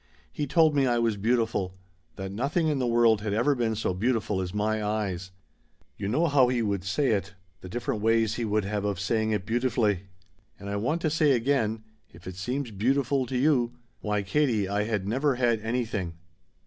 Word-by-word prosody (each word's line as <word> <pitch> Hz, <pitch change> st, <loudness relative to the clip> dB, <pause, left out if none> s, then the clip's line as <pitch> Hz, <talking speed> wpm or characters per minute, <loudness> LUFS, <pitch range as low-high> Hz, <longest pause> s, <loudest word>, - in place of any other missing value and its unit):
He 145 Hz, -, -3 dB
told 160 Hz, +1 st, +4 dB
me 140 Hz, -2 st, +3 dB
I 120 Hz, -1 st, +2 dB
was 115 Hz, -2 st, +1 dB
beautiful 110 Hz, -3 st, 0 dB, 0.4 s
that 95 Hz, 0 st, -5 dB
nothing 140 Hz, -, 0 dB
in 145 Hz, -3 st, 0 dB
the 125 Hz, -, 0 dB
world 115 Hz, -2 st, +4 dB
had 105 Hz, -1 st, -2 dB
ever 120 Hz, +6 st, +3 dB
been 115 Hz, -4 st, 0 dB
so 105 Hz, -3 st, -1 dB
beautiful 105 Hz, -1 st, 0 dB
as 90 Hz, -1 st, -4 dB
my 105 Hz, +1 st, -1 dB
eyes. 100 Hz, -4 st, -2 dB, 0.7 s
You 100 Hz, -, -4 dB
know 150 Hz, +11 st, +2 dB
how 140 Hz, -5 st, +4 dB
he 125 Hz, -2 st, 0 dB
would 100 Hz, -3 st, -1 dB
say 100 Hz, +9 st, 0 dB
it, 100 Hz, -2 st, -2 dB, 0.2 s
the 90 Hz, -, -10 dB
different 110 Hz, 0 st, -3 dB
ways 115 Hz, 0 st, +2 dB
he 120 Hz, -, -3 dB
would 105 Hz, -2 st, 0 dB
have 100 Hz, 0 st, -2 dB
of 100 Hz, -3 st, -1 dB
saying 110 Hz, +3 st, 0 dB
it 105 Hz, -4 st, -1 dB
beautifully. 110 Hz, -5 st, 0 dB, 0.5 s
And 100 Hz, 0 st, -7 dB
I -, -, -2 dB
want 150 Hz, +12 st, -1 dB
to 155 Hz, -, 0 dB
say 155 Hz, -2 st, +3 dB
again 115 Hz, -3 st, 0 dB, 0.3 s
if 85 Hz, +1 st, -16 dB
it 95 Hz, -, -6 dB
seems 125 Hz, +7 st, -3 dB
beautiful 130 Hz, +5 st, +1 dB
to 130 Hz, -, -2 dB
you 125 Hz, -3 st, +2 dB, 0.3 s
Why, 105 Hz, -1 st, -1 dB
Katie, 110 Hz, -2 st, +1 dB
I 100 Hz, +2 st, 0 dB
had 105 Hz, -3 st, -2 dB
never 135 Hz, +5 st, +1 dB
had 120 Hz, -3 st, +1 dB
anything. 110 Hz, -7 st, -2 dB
110 Hz, 200 wpm, -27 LUFS, 100-130 Hz, 0.7 s, told